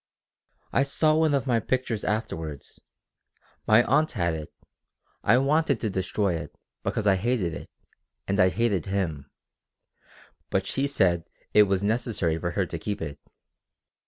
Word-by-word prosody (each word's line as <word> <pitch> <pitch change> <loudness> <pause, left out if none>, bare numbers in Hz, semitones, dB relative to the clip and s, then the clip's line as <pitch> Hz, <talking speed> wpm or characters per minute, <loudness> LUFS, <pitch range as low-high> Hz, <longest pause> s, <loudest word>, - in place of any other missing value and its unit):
"I - - +4
saw 155 +3 +2
one 155 -2 +3
of 140 - 0
the 120 -4 +2
pictures 125 -3 -1
afterward. 80 -10 -3 1.0
My 110 +3 +6
aunt 150 +6 +2
had 85 -5 0
it. 80 -1 -6 0.7
I 115 - +5
wanted 140 -1 +2
to 110 - -2
destroy 95 +1 0
it, 80 - -6 0.3
because 110 - -2
I 100 -2 +4
hated 105 -5 0
it, 85 - -8 0.6
and 100 +1 0
I 90 0 +6
hated 100 -4 0
him. 85 -8 -2 1.2
But 95 0 0
she 135 +7 -1
said 85 -11 +1 0.3
it 105 -1 +6
was 95 0 +1
necessary 105 -7 0
for 85 - -2
her 95 - +2
to 85 -1 -6
keep 105 +5 -3
it. 75 -3 -6
100 Hz, 150 wpm, -26 LUFS, 85-125 Hz, 1.2 s, My